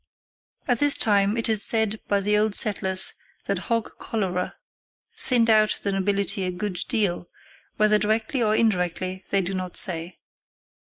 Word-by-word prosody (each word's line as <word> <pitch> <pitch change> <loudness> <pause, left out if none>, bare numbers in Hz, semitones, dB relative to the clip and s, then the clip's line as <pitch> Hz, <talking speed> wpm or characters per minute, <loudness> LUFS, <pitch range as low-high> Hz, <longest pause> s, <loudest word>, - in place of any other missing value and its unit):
At 245 -3 0
this 290 -1 +5
time, 205 0 +1
it 230 - -1
is 220 -2 +6
said 220 0 +3
by 200 -1 0
the 210 +1 0
old 210 -1 +1
settlers 190 -2 +3 0.3
that - - -3
hog 230 -2 -3
cholera 185 -5 -4 0.6
thinned 250 - +1
out 215 -1 +2
the 200 - -1
nobility 200 +1 -1
a 185 - -2
good 180 0 -5
deal, 195 -7 -1 0.5
whether 215 0 +2
directly 220 +5 -2
or 215 -1 +1
indirectly 185 -3 -2
they 195 - +1
do 190 +1 -5
not 185 -1 -5
say. 170 -2 +1
205 Hz, 155 wpm, -23 LUFS, 185-220 Hz, 0.6 s, is